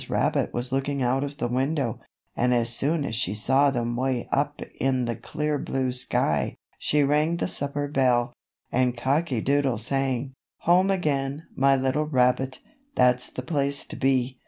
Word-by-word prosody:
Rabbit - - +1
was 120 +1 -3
looking 135 0 -1
out 130 +3 +1
of 145 0 -5
the 120 - -1
window, 130 0 -1 0.4
and 125 +1 +2
as 120 -1 0
soon 145 +5 0
as 115 - -4
she 105 -2 0
saw 135 +6 +3
them 120 -3 -1
way 130 -1 -1
up 145 +1 0
high - - -8
in 130 -2 +1
the 120 -1 -2
clear 150 -1 -2
blue 130 -1 -1
sky, 125 0 0 0.2
she 150 -1 +2
rang 150 +4 +2
the - - -1
supper 145 -3 -2
bell, 125 -3 +2 0.4
and 125 -1 +1
Cocky 135 0 0
Doodle 140 -2 +1
sang: 135 +2 -1 0.3
"Home 180 +3 +4
again, 145 -5 -1
my 135 0 +4
little 135 +3 0
rabbit, 130 -1 +1 0.3
That's 125 0 +3
the 130 - -6
place 140 -2 -1
to - - -9
be. 130 -1 +1
135 Hz, 170 wpm, -25 LUFS, 125-145 Hz, 0.4 s, Home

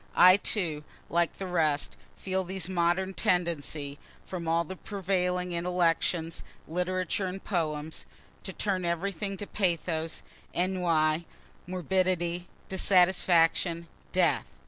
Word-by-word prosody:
I, 185 +1 +8
too, 165 -8 -1 0.3
like 170 0 +2
the 195 - -6
rest, 155 -5 +1 0.2
feel 190 0 -1
these 185 -1 -4
modern 185 +1 +1
tendencies 155 -6 -1 0.3
(from 175 -3 -5
all 165 +1 +3
the 190 +3 -7
prevailing 180 -2 -1
intellections, 170 -1 +1 0.3
literature 185 +2 -1
and 190 +1 -6
poems,) 155 -4 -2 0.3
to 190 - -5
turn 190 -1 -1
everything 195 +3 -2
to 205 - -5
pathos, 170 -5 -1 0.3
ennui, 170 -3 +1 0.4
morbidity, 180 0 0 0.2
dissatisfaction, 175 -2 +3 0.2
death. - - +2
180 Hz, 105 wpm, -29 LUFS, 165-185 Hz, 0.4 s, I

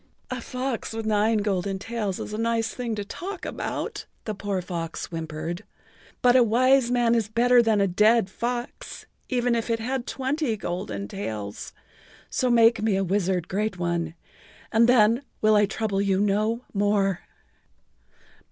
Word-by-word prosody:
"A 255 -1 -3
fox 250 -2 -4
with 225 0 -4
nine 215 0 +2
golden 195 -1 -1
tails 210 -2 -3
is - - -6
a - - -3
nice 230 0 0
thing 240 -3 -3
to 205 -1 -4
talk 370 - -6
about," - - -4 0.2
the 215 - -2
poor 200 -1 -2
fox 170 -2 -4
whimpered, 165 +2 -5 0.6
"but 245 0 +6
a 255 - +7
wise 250 +2 +4
man 240 -1 +3
is 230 -3 +1
better 240 +2 +5
than 220 -3 +2
a 200 - +4
dead 210 +3 +4
fox, 240 +4 -5 0.2
even 245 -2 +1
if 230 0 -1
it 230 -1 +1
had 255 +2 -3
twenty 265 -3 -1
golden 110 - -4
tails, 105 0 -5 0.6
so 255 - +1
make 230 -1 +5
me 215 -2 +2
a 195 - +1
wizard, 185 -2 0
Great 210 0 -2
One, 170 -2 -2 0.6
and 230 +2 +4
then 230 0 +5 0.2
will 215 0 +4
I 205 -1 +4
trouble 210 -2 -1
you 195 -1 +1
no 215 +4 +1
more." 200 -2 +1
215 Hz, 160 wpm, -25 LUFS, 195-235 Hz, 0.6 s, a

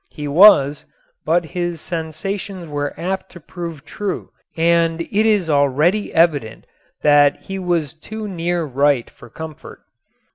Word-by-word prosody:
He 150 -1 -6
was, 145 -3 +5 0.4
but 170 +1 +2
his 175 0 -3
sensations 175 +3 -5
were 145 -1 -4
apt 190 +2 -3
to 175 - -11
prove 165 -3 -8
true 205 +3 -5 0.3
and 165 0 +2
it 210 +6 +1
is 205 -6 +2
already 150 +7 +2
evident 150 -9 +1 0.4
that 145 -1 +4
he 195 0 -5
was 170 -5 -1
too 215 +7 -7
near 175 -2 -2
right 140 -3 +1
for 120 - -15
comfort. 160 +3 -10
165 Hz, 135 wpm, -19 LUFS, 145-180 Hz, 0.4 s, was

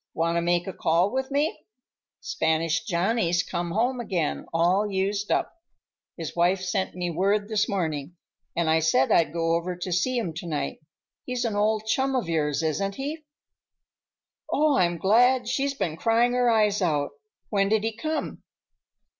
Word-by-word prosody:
Want 170 +1 0
to 170 - +2
make 175 0 +1
a 190 - -5
call 170 +5 +2
with 265 0 -1
me? 290 +3 -1 0.6
Spanish 160 +1 0
Johnny's 180 -1 +1
come 175 -1 -3
home 240 +7 0
again, 180 -9 -2
all 180 +5 +2
used 200 +1 -1
up. - - 0 0.6
His 165 -3 -6
wife 175 +2 +3
sent 185 0 -2
me 175 -1 -2
word 200 +5 +1
this 215 -2 0
morning, 165 -4 -3 0.4
and 170 -1 0
I 160 +1 +4
said 155 -5 +2
I'd 160 -4 +4
go 165 0 0
over 170 +2 -1
to 180 +1 -5
see 245 +9 +1
him 195 -9 -2
to 175 -1 -6
night. 145 -4 -3 0.4
He's 250 -1 -2
an 220 -3 -1
old 215 +1 +1
chum 265 +4 +1
of 245 -9 -1
yours, 155 -2 0
isn't 195 +6 -1
he?" 300 +5 -5 1.3
"Oh, 300 -1 +3
I'm 175 -1 +2
glad. 245 +6 +3
She's 275 +3 0
been 170 - -2
crying 235 +4 +2
her 245 -1 +3
eyes 210 -2 +2
out. 150 -5 0 0.4
When 195 -2 +1
did 215 0 +2
he 225 -1 -2
come?" 310 +7 -3
190 Hz, 170 wpm, -26 LUFS, 170-225 Hz, 1.3 s, I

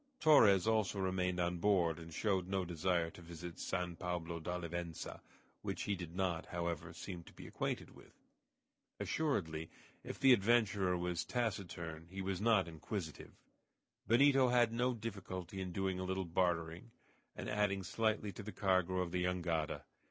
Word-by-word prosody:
Torres 105 - +7
also 110 -2 +2
remained 90 -1 0
on 90 0 +1
board, 85 -4 +3
and 80 0 -9
showed 95 +1 0
no 95 -1 0
desire 85 0 0
to 85 - -13
visit 85 0 -8
San 90 -2 -2
Pablo 85 -1 -3
d'Olivença, 85 0 -4 0.4
which - - -3
he 100 - 0
did 90 -3 -6
not, 90 -3 -1
however, 85 -2 -3
seem 90 -3 -7
to - - -14
be - - -11
acquainted - - -3
with. - - -17 0.8
Assuredly 80 - -1 0.3
if - - -6
the 135 -1 +8
adventurer 100 -4 +3
was 90 -1 -1
taciturn 85 -9 -3
he 95 +2 -7
was 95 -1 -2
not 110 -5 +4
inquisitive. 80 0 -5 0.7
Benito 135 +2 +6
had 120 -2 +4
no 125 +2 +1
difficulty 95 -4 -5
in 90 -1 -4
doing 95 0 -1
a - - -2
little 95 0 -1
bartering, 85 +3 0 0.5
and - - -5
adding 100 -2 +1
slightly 105 +2 0
to 110 - -8
the 105 +1 -6
cargo 95 -3 +2
of 90 -2 -2
the 90 0 0
jangada. 85 -3 -1
90 Hz, 155 wpm, -36 LUFS, 85-105 Hz, 0.8 s, the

